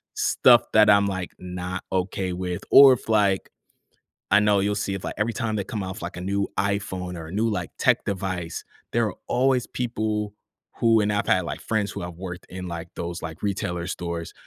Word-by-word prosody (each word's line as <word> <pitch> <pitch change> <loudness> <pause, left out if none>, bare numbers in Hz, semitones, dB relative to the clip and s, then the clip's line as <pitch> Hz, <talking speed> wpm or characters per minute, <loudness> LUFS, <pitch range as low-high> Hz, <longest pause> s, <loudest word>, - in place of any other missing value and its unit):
stuff 120 -2 +5
that 105 -1 +6
I'm, 100 0 +6
like, 95 -2 -3
not 90 0 -5
okay 95 0 -1
with. 90 0 -4
Or 135 -1 +10
if, 120 - -5
like 100 -3 +2 0.8
I 100 - +6
know 105 -1 +3
you'll 100 +1 +1
see 100 -1 -2
if 95 - -6
like, - - -4
every 110 +2 0
time 115 -2 -2
they 100 - -2
come 105 -1 -4
off, 95 +3 -6
like, 85 +2 -6
a - - -5
new 100 +2 -1
iPhone 95 -2 -2
or 80 -1 -7
a - - -9
new, 110 +4 +1
like, 105 - -2
tech - - +3
device, 90 -4 -3 0.3
there - - +2
are - - -7
always 130 -1 +2
people 110 -3 -2 0.5
who 115 -1 +4
and 105 0 +1
I've 105 - 0
had 90 - +3
like - - -5
friends 105 -2 -1
who - - -6
have 90 0 -6
worked 90 0 -7
in, 90 0 -6
like, 85 0 -6
those, 85 0 -5
like, 80 +1 -7
retailer 90 -4 -2
stores, 85 -2 -4
95 Hz, 205 wpm, -24 LUFS, 90-105 Hz, 0.8 s, Or